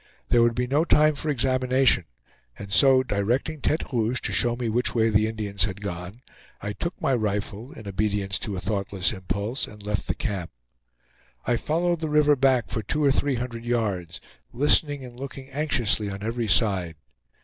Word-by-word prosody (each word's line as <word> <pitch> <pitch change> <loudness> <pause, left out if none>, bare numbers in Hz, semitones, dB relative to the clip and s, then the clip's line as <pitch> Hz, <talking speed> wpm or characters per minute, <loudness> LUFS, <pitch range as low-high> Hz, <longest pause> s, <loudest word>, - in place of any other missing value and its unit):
There 120 - +5
would 115 0 +3
be 125 - 0
no 140 +5 +2
time 155 -2 +4
for 150 +2 -4
examination, 130 - +2 0.5
and 100 -1 -7
so 130 +2 +5
directing 125 +8 -1
Tete 155 -2 -1
Rouge 120 +1 +1
to - - -2
show 120 +5 +1
me 120 -1 -3
which 120 +3 0
way 115 -1 +3
the 110 +1 +3
Indians 105 -3 -1
had 100 -2 -5
gone, 90 +5 -6 0.4
I 105 - -4
took 170 - -5
my 135 - +1
rifle, 110 +1 -2
in 110 -9 -10
obedience 100 0 -1
to 100 -3 -4
a - - -2
thoughtless 100 0 -1
impulse, 100 +6 -3
and 105 -1 -13
left 105 0 -2
the - - -1
camp. 100 - -3 1.0
I 120 - +2
followed 170 +6 0
the 160 -1 -3
river 150 -1 +4
back 130 -3 +2
for 110 - -1
two 150 +9 -1
or 140 - +5
three 140 0 +1
hundred 120 -1 -5
yards, 110 -8 -2 0.3
listening 145 +1 +2
and 120 0 -12
looking 135 0 -8
anxiously 125 -8 0
on 100 0 -6
every 115 +1 -2
side. 90 -3 +1
115 Hz, 180 wpm, -25 LUFS, 100-135 Hz, 1.0 s, There